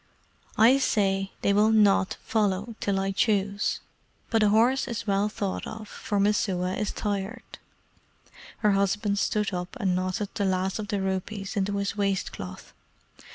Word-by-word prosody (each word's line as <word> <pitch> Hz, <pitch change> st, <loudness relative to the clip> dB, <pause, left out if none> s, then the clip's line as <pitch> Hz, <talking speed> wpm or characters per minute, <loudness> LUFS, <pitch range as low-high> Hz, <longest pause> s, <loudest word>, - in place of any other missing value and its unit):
"I 245 Hz, +5 st, +6 dB
say 195 Hz, -6 st, +1 dB
they 200 Hz, -, +3 dB
will 210 Hz, +2 st, +4 dB
NOT 205 Hz, -3 st, +4 dB
follow 210 Hz, 0 st, 0 dB
till 195 Hz, -1 st, 0 dB
I 195 Hz, 0 st, -1 dB
choose; 200 Hz, 0 st, 0 dB, 0.5 s
but 225 Hz, -1 st, +3 dB
a 210 Hz, -, +5 dB
horse 240 Hz, +6 st, +3 dB
is 230 Hz, -2 st, -4 dB
well 200 Hz, 0 st, +1 dB
thought 200 Hz, -2 st, -3 dB
of, 220 Hz, -1 st, -7 dB
for 205 Hz, -1 st, -3 dB
Messua 190 Hz, -3 st, +1 dB
is 210 Hz, -, -2 dB
tired." 205 Hz, +2 st, -4 dB, 1.1 s
Her 210 Hz, -, +6 dB
husband 200 Hz, +1 st, +1 dB
stood 210 Hz, -1 st, 0 dB
up 180 Hz, +7 st, -4 dB
and 190 Hz, -5 st, +1 dB
knotted 185 Hz, +2 st, -2 dB
the 200 Hz, -, -1 dB
last 190 Hz, +1 st, 0 dB
of 210 Hz, -, -4 dB
the 205 Hz, -3 st, -1 dB
rupees 195 Hz, +1 st, -3 dB
into 200 Hz, 0 st, 0 dB
his 200 Hz, 0 st, -2 dB
waist 195 Hz, -2 st, 0 dB
cloth. 90 Hz, -1 st, -9 dB
200 Hz, 155 wpm, -27 LUFS, 195-215 Hz, 1.1 s, I